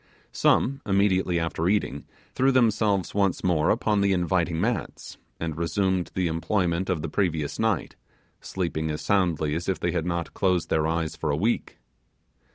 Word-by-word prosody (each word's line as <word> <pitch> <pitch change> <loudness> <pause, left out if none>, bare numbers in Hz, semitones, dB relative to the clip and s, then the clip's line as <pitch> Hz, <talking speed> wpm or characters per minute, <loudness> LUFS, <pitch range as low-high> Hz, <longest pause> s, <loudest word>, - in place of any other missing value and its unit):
Some, 135 +2 +2
immediately 95 -3 +2
after 80 +1 -1
eating, 85 -9 -1 0.3
threw 135 +1 +3
themselves 110 -6 +2
once 100 -2 +1
more 80 -4 +2
upon 105 -2 +2
the 100 -1 +3
inviting 85 -2 0
mats, - - -3 0.2
and 80 -2 -3
resumed 95 +2 0
the 95 - 0
employment 85 +2 0
of 85 -5 -1
the - - -2
previous 80 -4 -1
night, 110 -5 0 0.4
sleeping 80 -4 -3
as 75 0 -3
soundly 85 -7 +1
as 85 +4 -3
if 95 -4 -1
they 85 - 0
had 85 0 -2
not 85 -1 -3
closed 90 -3 0
their 80 0 +2
eyes 80 -1 -1
for 80 - -3
a 70 - +1
week. 110 +8 -1
90 Hz, 165 wpm, -25 LUFS, 80-100 Hz, 0.4 s, threw